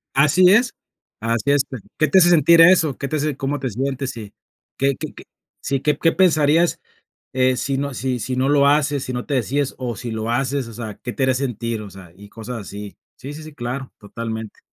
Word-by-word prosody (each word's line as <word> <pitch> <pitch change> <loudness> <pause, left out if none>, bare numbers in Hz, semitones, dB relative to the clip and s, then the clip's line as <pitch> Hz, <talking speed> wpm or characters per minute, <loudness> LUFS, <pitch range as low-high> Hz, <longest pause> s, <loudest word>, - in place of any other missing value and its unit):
Así 155 +6 +5
es, 235 +2 +3 0.5
así 115 -1 0
es 145 -1 +3
¿T 130 - -7 0.2
qué 155 - +3
te 190 +6 +5
hace 175 0 +6
sentir 170 0 +6
eso? 165 -5 +5
¿Qué 140 - -4
te 155 - -3
hace 150 -2 -1
cómo 140 +1 -2
te 130 -2 -2
sientes? 135 +3 -2
Sí, 105 -3 -9 0.5
qué 135 0 +1
qué, - - -6 0.5
sí, 135 -1 -1
qué 150 +1 0
qué 165 - +3
pensarías 165 -1 +3 0.8
si 135 +1 -2
no 140 -1 -3
si 125 -1 -2
si 130 +3 -3
no 130 +2 +1
lo 140 -1 +4
haces, 145 -1 +2
si 125 - -5
no 125 - -4
te 140 - -1
decides, 135 +3 -1
o, 120 -3 -4
si 120 +1 -6
lo 110 +1 -3
haces, 135 0 -1
o 115 - -10
sea, 110 -3 -6
qué 120 - -4
te 135 - -2
haría 130 0 +2
sentir, 115 -4 -3
o 105 - -9
sea, 95 -3 -13
y 100 +1 -14
cosas 115 +2 -7
así. 100 +1 -9 0.2
Sí, 140 +3 -8
sí, 155 +1 -9
sí, 155 -1 -11
claro, 130 +1 -5
totalmente. 110 +1 -6
135 Hz, 220 wpm, -21 LUFS, 115-145 Hz, 0.8 s, hace